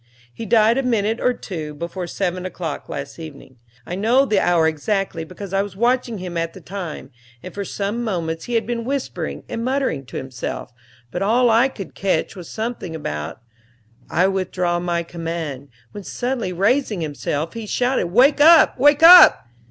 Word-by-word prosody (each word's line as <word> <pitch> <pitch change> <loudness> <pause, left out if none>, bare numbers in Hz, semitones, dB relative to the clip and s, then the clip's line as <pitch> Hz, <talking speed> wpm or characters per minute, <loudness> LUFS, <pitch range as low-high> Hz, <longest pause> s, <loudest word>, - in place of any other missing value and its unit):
He 225 - -7
died 225 +3 +4
a - - +2
minute 225 -3 0
or 250 - +2
two 160 -10 -6
before 170 +3 -5
seven 180 0 -3
o'clock 175 -5 -5
last 140 +3 -6
evening; 140 -5 -11 0.3
I - - -6
know 230 +8 +3
the 210 -7 +2
hour 175 -3 +3
exactly, 165 +2 -2
because 185 +3 -9
I 195 - +2
was 200 -2 -6
watching 240 +1 0
him 180 -2 -6
at 165 0 -2
the - - -11
time, 180 -7 -7 0.3
and 185 - -9
for 200 - -4
some 205 +4 -3
moments 165 -7 -3
he 240 - -3
had 230 - +1
been 235 0 -3
whispering 270 +2 -4
and 230 - -4
muttering 255 - -1
to - - -7
himself, 130 -2 -6 0.4
but 175 - -4
all 235 +4 +3
I 230 +4 +4
could 205 -8 -9
catch 190 -5 -1
was 180 -3 -10
something 220 -7 -5
about, 75 - -5 0.7
"I 175 +3 +2
withdraw 180 -2 -1
my 175 -1 -1
command;" 165 -5 -5 0.2
when, 205 - -9
suddenly 245 -2 -3
raising 205 +2 +1
himself, 150 +1 -3
he 230 -2 -7
shouted, 250 -1 0
"Wake 260 - +4
up, 320 -3 +6
wake 290 +3 +4
up!" 345 - +9
195 Hz, 175 wpm, -21 LUFS, 165-235 Hz, 0.7 s, up